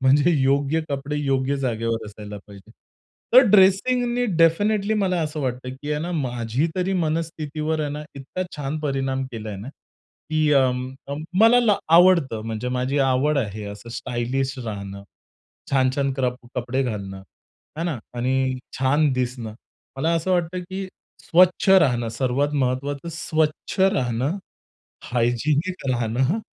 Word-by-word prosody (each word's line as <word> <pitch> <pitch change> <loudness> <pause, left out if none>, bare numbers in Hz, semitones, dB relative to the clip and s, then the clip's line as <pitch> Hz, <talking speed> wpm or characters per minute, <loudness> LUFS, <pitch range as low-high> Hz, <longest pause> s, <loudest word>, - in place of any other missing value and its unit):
म्हणजे 140 +5 +4
योग्य 140 +4 +2
कपडे 140 +1 -3
योग्य 135 -1 0
जागेवर 115 -3 -2
असायला 105 0 -9
पाहिजे. 100 -2 -14 0.6
तर 255 - +10
ड्रेसिंगनी 240 +5 +4
डेफिनिटली 200 +6 +3
मला 185 -4 +1
असं 155 0 -3
वाटतं 130 -1 -3
की 145 - -4
आहे 150 - -1
ना 175 - -4
माझी 125 -2 -1
तरी 185 +1 0
मनस्थितीवर 160 -2 -2
आहे 150 - -1
ना, 150 +1 -5
इतका 140 +7 -5
छान 145 +1 -3
परिणाम 135 -2 -1
केलाय 110 -3 -6
ना 105 +6 -8 0.6
की 155 -1 +2
अ, 130 -2 +4
म 130 +1 -5 0.5
मला 230 +2 +7
ला 215 -4 +3 0.2
आवडतं 170 -11 +5
म्हणजे 115 +2 -3
माझी 130 +3 0
आवड 135 +2 +2
आहे, 105 -3 -3
असं 100 +3 -9
स्टायलिश 130 +2 -2
राहणं 100 -2 -6 0.7
छान-छान 135 +1 +2
कप 125 -2 -1 0.2
कपडे 125 +2 -1
घालणं 100 -6 -5 0.6
है 165 - -1
ना? 165 -7 -2 0.2
आणि 130 +1 0 0.2
छान 140 +2 +3
दिसणं. 125 -3 -3 0.4
मला 155 +5 0
असं 165 +3 -1
वाटतं 180 0 0
की 190 0 -4 0.4
स्वच्छ 180 +2 +3
राहणं 125 -11 +4
सर्वात 130 +5 0
महत्त्वाचं, 140 +5 -2
स्वच्छ 155 -1 -2
राहणं, 135 - +1 0.7
हायजिनिक 140 +10 0
राहणं, 125 - 0
135 Hz, 135 wpm, -23 LUFS, 125-165 Hz, 0.7 s, तर